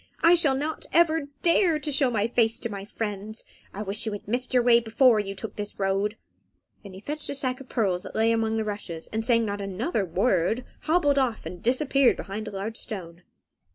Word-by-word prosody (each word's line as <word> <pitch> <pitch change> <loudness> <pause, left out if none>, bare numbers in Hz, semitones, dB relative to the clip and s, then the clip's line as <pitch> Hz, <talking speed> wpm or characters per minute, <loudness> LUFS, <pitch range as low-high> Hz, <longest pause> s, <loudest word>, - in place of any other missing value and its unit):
I 335 - +7
shall 305 -6 +5
not 300 +4 -4
ever 320 -3 +3 0.2
dare 340 -1 +4
to 300 0 -3
show 275 -2 +3
my 220 -2 0
face 230 -1 +2
to 235 - -3
my 200 -1 -6
friends. 210 0 -5 0.3
I 205 - -5
wish 205 +3 0
you 215 - -2
had 205 - -8
missed 245 +3 0
your 250 -1 +3
way 235 -1 +6
before 230 0 +3
you 195 -1 -4
took 200 +1 -7
this 205 0 -5
road." 195 +2 0 0.6
Then 200 -3 -11
he 190 - -10
fetched 300 +5 -4
a 280 - -2
sack 255 -1 -1
of 265 - -13
pearls 190 -7 0
that - - -10
lay 225 +1 +3
among 225 -1 0
the 220 - -1
rushes, 195 -6 -5
and 220 +1 -1
saying 230 -1 +3
not 205 -1 -3
another 200 - -2
word, 190 +5 0 0.2
hobbled 300 -3 +3
off 245 -8 -1
and 175 +2 -7
disappeared 260 +2 +3
behind 210 +2 -6
a - - -5
large 205 +3 -5
stone. 175 -5 -6
225 Hz, 215 wpm, -26 LUFS, 200-265 Hz, 0.6 s, I